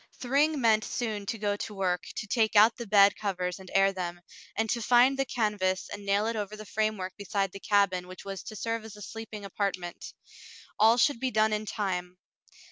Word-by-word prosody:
Thryng 285 Hz, +4 st, +2 dB
meant 220 Hz, -3 st, +3 dB
soon 215 Hz, -4 st, -3 dB
to 225 Hz, -, -2 dB
go 205 Hz, -1 st, -1 dB
to 210 Hz, -, -6 dB
work, 180 Hz, -2 st, -1 dB
to -, -, -4 dB
take 220 Hz, 0 st, +1 dB
out 215 Hz, +3 st, +7 dB
the 235 Hz, -2 st, -7 dB
bed 200 Hz, -1 st, +6 dB
covers 180 Hz, -3 st, -3 dB
and 190 Hz, -1 st, -12 dB
air 195 Hz, 0 st, +4 dB
them, 175 Hz, -2 st, -4 dB, 0.4 s
and 220 Hz, +1 st, +1 dB
to 235 Hz, -, -1 dB
find 245 Hz, +4 st, +5 dB
the 270 Hz, 0 st, 0 dB
canvas 205 Hz, -6 st, -1 dB
and 205 Hz, 0 st, -7 dB
nail 200 Hz, +2 st, +2 dB
it 230 Hz, +1 st, -1 dB
over 210 Hz, -1 st, -4 dB
the 215 Hz, 0 st, -9 dB
framework 210 Hz, -2 st, -2 dB
beside 200 Hz, -1 st, -1 dB
the 195 Hz, -, -9 dB
cabin 195 Hz, -3 st, +1 dB
which 185 Hz, +1 st, -11 dB
was 195 Hz, -1 st, -5 dB
to 215 Hz, -, -7 dB
serve 230 Hz, +1 st, -3 dB
as 220 Hz, -2 st, -10 dB
a 210 Hz, -, -12 dB
sleeping 225 Hz, -2 st, -8 dB
apartment. 190 Hz, -3 st, -4 dB, 0.6 s
All 225 Hz, +2 st, +6 dB
should 250 Hz, +1 st, +3 dB
be 260 Hz, -, 0 dB
done 220 Hz, -2 st, +2 dB
in 215 Hz, 0 st, -2 dB
time. 180 Hz, -4 st, -3 dB
210 Hz, 210 wpm, -28 LUFS, 195-225 Hz, 0.6 s, out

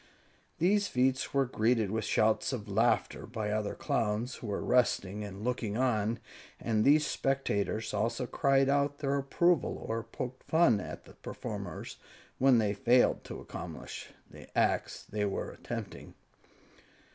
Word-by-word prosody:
These 200 Hz, +4 st, +3 dB
feats 130 Hz, +1 st, +1 dB
were 140 Hz, -1 st, +2 dB
greeted 115 Hz, -3 st, +1 dB
with 110 Hz, -1 st, -1 dB
shouts 110 Hz, +4 st, +2 dB
of 110 Hz, -4 st, -4 dB
laughter 110 Hz, +4 st, +1 dB
by 110 Hz, -2 st, -3 dB
other 105 Hz, -1 st, -1 dB
Clowns 110 Hz, +4 st, -1 dB
who 115 Hz, -, -8 dB
were 100 Hz, -, -2 dB
resting 105 Hz, -5 st, +2 dB
and 100 Hz, 0 st, -7 dB
looking 115 Hz, -3 st, -1 dB
on, 115 Hz, -3 st, +1 dB, 0.4 s
and 110 Hz, -2 st, +1 dB
these 150 Hz, +3 st, +5 dB
spectators 115 Hz, -7 st, -1 dB
also 115 Hz, +5 st, 0 dB
cried 135 Hz, +1 st, +2 dB
out 140 Hz, +1 st, +2 dB
their 140 Hz, -1 st, 0 dB
approval 165 Hz, +3 st, +2 dB
or 115 Hz, +1 st, -1 dB
poked 130 Hz, +2 st, -6 dB
fun 160 Hz, -10 st, +4 dB
at 90 Hz, -, -7 dB
the -, -, -14 dB
performers -, -, -6 dB, 0.4 s
when 130 Hz, -1 st, +6 dB
they 105 Hz, -2 st, +2 dB
failed 125 Hz, +2 st, +3 dB
to -, -, -7 dB
accomplish -, -, -7 dB, 0.2 s
the -, -, -13 dB
acts -, -, +1 dB
they 105 Hz, 0 st, -3 dB
were 100 Hz, -, -3 dB
attempting. -, -, -7 dB
120 Hz, 145 wpm, -31 LUFS, 105-135 Hz, 0.4 s, when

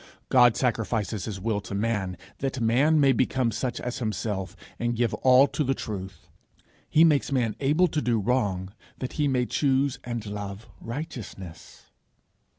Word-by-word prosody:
God 120 Hz, -3 st, +6 dB
sacrifices 110 Hz, -5 st, -1 dB
his 105 Hz, -4 st, -5 dB
will 105 Hz, +1 st, -1 dB
to 100 Hz, -, -6 dB
man 100 Hz, -4 st, -1 dB, 0.2 s
that 135 Hz, -1 st, -2 dB
man 130 Hz, +7 st, +3 dB
may 140 Hz, -2 st, +5 dB
become 130 Hz, -1 st, +1 dB
such 120 Hz, +3 st, -3 dB
as 125 Hz, +1 st, -4 dB
himself, 105 Hz, -4 st, -3 dB, 0.2 s
and 120 Hz, 0 st, 0 dB
give 120 Hz, -1 st, 0 dB
all 130 Hz, +1 st, +6 dB
to 140 Hz, +3 st, -1 dB
the 135 Hz, 0 st, 0 dB
truth; 95 Hz, -7 st, -7 dB, 0.6 s
he 160 Hz, -, +5 dB
makes 150 Hz, -4 st, +3 dB
man 120 Hz, -6 st, 0 dB
able 150 Hz, +6 st, +3 dB
to 150 Hz, 0 st, -1 dB
do 120 Hz, -4 st, +1 dB
wrong, 100 Hz, -4 st, -1 dB, 0.2 s
that 130 Hz, -, -5 dB
he 150 Hz, -1 st, +1 dB
may 125 Hz, -2 st, +1 dB
choose 135 Hz, 0 st, +1 dB
and 120 Hz, -3 st, -4 dB
love 100 Hz, +1 st, -6 dB
righteousness. 115 Hz, -, -8 dB
120 Hz, 155 wpm, -26 LUFS, 105-135 Hz, 0.6 s, God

